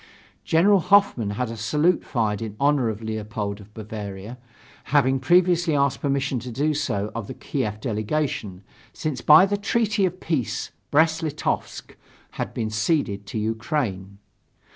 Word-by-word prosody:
General 195 +5 +4
Hoffmann 185 - +3
had 125 -2 -2
a - - -5
salute 150 +10 +1
fired 110 -5 -1
in 110 -2 -5
honor 140 -4 +2
of 110 0 -5
Leopold 105 -2 -4
of 105 +1 -16
Bavaria, 105 +1 -7 0.5
having 135 -2 +2
previously 175 +2 +3
asked 140 -2 +1
permission 140 -2 0
to 125 - -7
do 145 +6 0
so 105 -9 -2
of 115 -3 -5
the 130 - -7
Kiev 110 -7 -3
delegation, 110 -3 -2 0.3
since 145 -6 -3
by 155 +7 +8
the 205 +1 -1
treaty 215 0 0
of 185 +1 -7
peace 150 -11 -2 0.2
Brest 160 +2 +3
Litovsk 155 -2 -3 0.4
had - - -4
been 110 -2 -3
ceded 105 -3 0
to - - -5
Ukraine. 110 - -2
130 Hz, 145 wpm, -24 LUFS, 110-155 Hz, 0.5 s, by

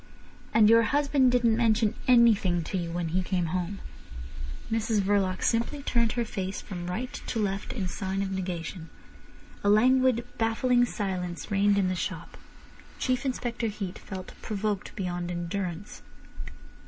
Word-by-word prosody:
"And 215 -1 +6
your 230 +1 +7
husband 280 +1 +3
didn't 240 -2 +3
mention 225 -2 +3
anything 220 -8 +5
to 175 - -5
you 175 -2 -2
when 170 -1 -2
he 185 +3 +1
came 180 -1 -1
home?" 185 +2 -2 0.9
Mrs 225 -1 +1
Verloc 195 -2 +1
simply 240 +5 0
turned 235 -4 +1
her 240 -1 -1
face 190 -2 -4
from 175 -3 -6
right 240 +8 -3
to - - -2
left 200 -1 -2
in 195 -7 -3
sign 190 +2 -2
of 195 - -3
negation. 180 -2 -4 0.7
A 205 - +3
languid, 250 +2 +4
baffling 245 +2 +3
silence 185 -4 -4
reigned 200 0 +3
in 195 -2 +2
the 185 - 0
shop. 180 - -4 0.6
Chief 255 0 0
Inspector 240 -2 -2
Heat 200 -3 -5
felt 185 -1 -8
provoked 210 -1 -3
beyond 175 -3 -3
endurance. 175 +2 -4
205 Hz, 145 wpm, -28 LUFS, 185-235 Hz, 0.9 s, your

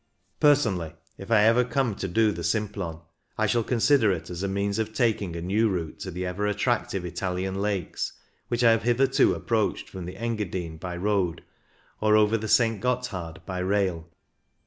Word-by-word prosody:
Personally, 105 - +2 0.2
if 95 - -9
I 110 -2 +5
ever 115 +3 +5
come 125 -2 0
to 95 - -3
do 110 +3 +3
the 85 -4 -5
Simplon, 95 -3 -2 0.4
I 110 - +2
shall 115 +2 +1
consider 120 -1 +3
it 95 - -4
as 90 0 -5
a 100 - -1
means 100 +2 -1
of 110 0 -2
taking 110 -8 0
a 85 - -5
new 105 +5 +2
route 85 -5 -3
to 95 - -5
the 90 +1 -4
ever 95 +3 -2
attractive 105 -3 -1
Italian 95 +2 -3
lakes, 100 -4 -2 0.3
which 120 0 -1
I 115 - +7
have 115 0 +3
hitherto 125 +3 +3
approached 110 -3 -1
from 95 -2 -7
the 90 +2 -8
Engadine 100 -8 -3
by 90 +2 -6
road 95 -3 0 0.6
or 105 0 +4
over 105 +1 +4
the 110 0 -2
St. 115 -3 +3
Gotthard 95 -10 -3
by 95 -1 -4
rail. 90 -3 0
100 Hz, 180 wpm, -26 LUFS, 90-115 Hz, 0.6 s, I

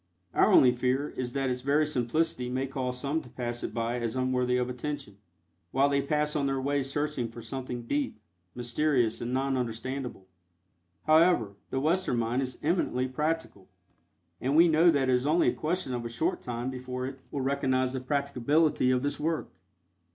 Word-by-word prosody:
Our - - +4
only 125 - +7
fear 130 +4 0
is 125 -1 -4
that 135 -2 0
its 125 0 -3
very 145 +3 +3
simplicity 130 -1 0
may 130 +2 -1
cause 130 -2 -3
some 145 +4 -1
to 125 - -14
pass 120 -1 -4
it - - -3
by 115 +1 -1
as 115 -1 -2
unworthy 125 -1 +1
of 125 -1 0
attention, 125 -4 -5 0.5
while 135 +2 +3
they 140 0 +2
pass 150 +2 0
on 140 -2 +1
their 135 -1 0
way 140 +1 0
searching 140 -2 -2
for 115 0 -10
something 125 0 -5
"deep," 140 -1 -2 0.4
mysterious 120 -1 +1
and 120 +1 -3
non 135 +1 0
understandable. 125 -2 -4 0.8
However, 155 - +4 0.2
the 135 - -1
Western 160 -2 +1
mind 120 +3 0
is 130 -1 -3
eminently 150 -6 +1
practical, 150 -7 -3 0.7
and 135 +3 0
we 170 +2 +7
know 165 +2 +5
that 140 -5 +2
it 130 - +3
is 125 +2 +1
only 165 +3 +4
a - - -1
question 165 -3 -2
of 120 -1 -3
a 115 - -4
short 120 - -1
time 120 +1 -3
before 125 0 -5
it 135 0 -6
will 140 - -3
recognize 130 -1 +1
the 130 - -2
practicability 140 +1 +1
of 130 0 +2
this 145 0 -2
work. 160 +1 -2
130 Hz, 185 wpm, -29 LUFS, 125-145 Hz, 0.8 s, only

